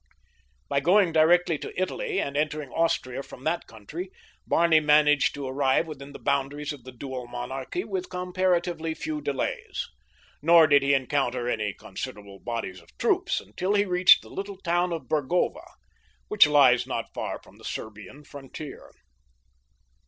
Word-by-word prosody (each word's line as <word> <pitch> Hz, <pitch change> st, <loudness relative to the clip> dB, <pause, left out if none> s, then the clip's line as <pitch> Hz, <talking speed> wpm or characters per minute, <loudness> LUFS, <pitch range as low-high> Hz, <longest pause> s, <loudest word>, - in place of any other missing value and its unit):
By 140 Hz, -, +1 dB
going 180 Hz, +4 st, +4 dB
directly 165 Hz, 0 st, +4 dB
to -, -, -6 dB
Italy 410 Hz, -, -1 dB
and 140 Hz, -, -3 dB
entering 150 Hz, -2 st, -2 dB
Austria 135 Hz, -6 st, 0 dB
from 130 Hz, -, -12 dB
that 165 Hz, +3 st, -1 dB
country 150 Hz, -, -8 dB, 0.4 s
Barney 165 Hz, -2 st, +4 dB
managed 150 Hz, -1 st, +4 dB
to 140 Hz, -1 st, -5 dB
arrive 135 Hz, +3 st, +1 dB
within 145 Hz, -3 st, -9 dB
the -, -, -9 dB
boundaries 140 Hz, +2 st, -1 dB
of 130 Hz, -5 st, -13 dB
the 130 Hz, -, -9 dB
dual 130 Hz, 0 st, -7 dB
monarchy 130 Hz, +7 st, -4 dB
with 190 Hz, -4 st, -4 dB
comparatively 180 Hz, -3 st, -1 dB
few 155 Hz, -1 st, -4 dB
delays. 140 Hz, -2 st, -3 dB, 0.5 s
Nor 165 Hz, +1 st, +7 dB
did 145 Hz, -2 st, +5 dB
he 140 Hz, +1 st, +3 dB
encounter 130 Hz, -2 st, -1 dB
any 105 Hz, -4 st, -1 dB
considerable 100 Hz, -1 st, -8 dB
bodies 115 Hz, -6 st, -5 dB
of -, -, -24 dB
troops -, -, +1 dB
until 180 Hz, -, -2 dB
he 205 Hz, 0 st, +3 dB
reached 180 Hz, -2 st, +6 dB
the -, -, -14 dB
little 200 Hz, 0 st, -6 dB
town 175 Hz, -1 st, 0 dB
of 165 Hz, -2 st, -3 dB
Burgova, 175 Hz, -, 0 dB, 0.6 s
which 210 Hz, -7 st, +6 dB
lies 140 Hz, -5 st, +5 dB
not -, -, -4 dB
far -, -, -4 dB
from -, -, -20 dB
the -, -, -17 dB
Serbian 110 Hz, +7 st, -7 dB
frontier. 140 Hz, +1 st, -10 dB
150 Hz, 150 wpm, -26 LUFS, 130-175 Hz, 0.6 s, Nor